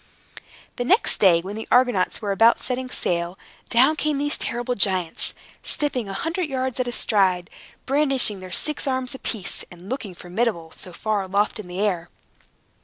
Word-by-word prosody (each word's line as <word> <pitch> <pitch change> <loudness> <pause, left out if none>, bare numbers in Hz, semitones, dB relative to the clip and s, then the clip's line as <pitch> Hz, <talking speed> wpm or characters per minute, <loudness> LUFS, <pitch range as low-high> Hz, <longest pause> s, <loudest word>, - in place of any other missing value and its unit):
The 245 - -1
next 390 - +3
day, 175 -4 +6
when 195 +4 -6
the 220 - -6
Argonauts 245 -5 +2
were 205 - 0
about 225 +4 +5
setting 255 0 -2
sail, 175 -4 -2 0.3
down 260 +6 +5
came 300 -1 0
these 290 +1 +1
terrible 240 +1 -2
giants, 185 -6 +1 0.3
stepping 255 -8 -1
a - - -4
hundred 330 - -2
yards 260 -1 -2
at 250 - 0
a - - -1
stride, 190 -7 +1 0.3
brandishing 270 -7 +2
their 185 -1 -9
six 300 +8 0
arms 260 -1 0
apiece, 225 -7 -3
and 175 +2 -13
looking 225 -8 -4
formidable, 180 -2 -2
so 180 - -9
far 210 +3 -1
aloft 200 +4 0
in 205 - -7
the 180 +1 -6
air. 180 -5 0
220 Hz, 170 wpm, -23 LUFS, 185-260 Hz, 0.3 s, day